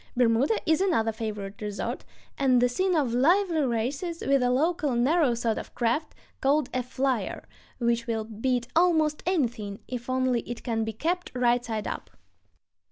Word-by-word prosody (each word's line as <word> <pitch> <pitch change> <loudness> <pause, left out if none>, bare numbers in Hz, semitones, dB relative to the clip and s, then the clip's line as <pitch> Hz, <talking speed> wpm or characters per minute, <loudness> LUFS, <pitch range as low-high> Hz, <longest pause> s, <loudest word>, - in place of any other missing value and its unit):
Bermuda 250 - +3
is 315 +1 +3
another 320 - +2
favorite 210 -3 -5
resort, 205 -1 -4 0.3
and 260 -3 +3
the 245 - +4
scene 370 +9 0
of 275 -7 +1
lively 335 +6 +3
races 275 +8 -2
with 275 -1 +3
a 250 - +2
local, 295 +1 +1
narrow 265 +1 +3
sort 230 -1 -1
of - - -10
craft, 240 +6 0 0.3
called 285 +3 +2
a 255 - +1
"flyer," 255 -1 -2 0.3
which 235 -1 0
will 225 -1 -1
beat 235 +3 -2
almost 315 -3 +3
anything 240 - -1
if 245 0 -6
only 255 -1 +1
it 240 - -6
can 225 -2 -1
be 220 - -2
kept 345 - -2
right 245 -1 +2
side 220 -3 -3
up. - - -5
250 Hz, 165 wpm, -27 LUFS, 230-305 Hz, 0.3 s, the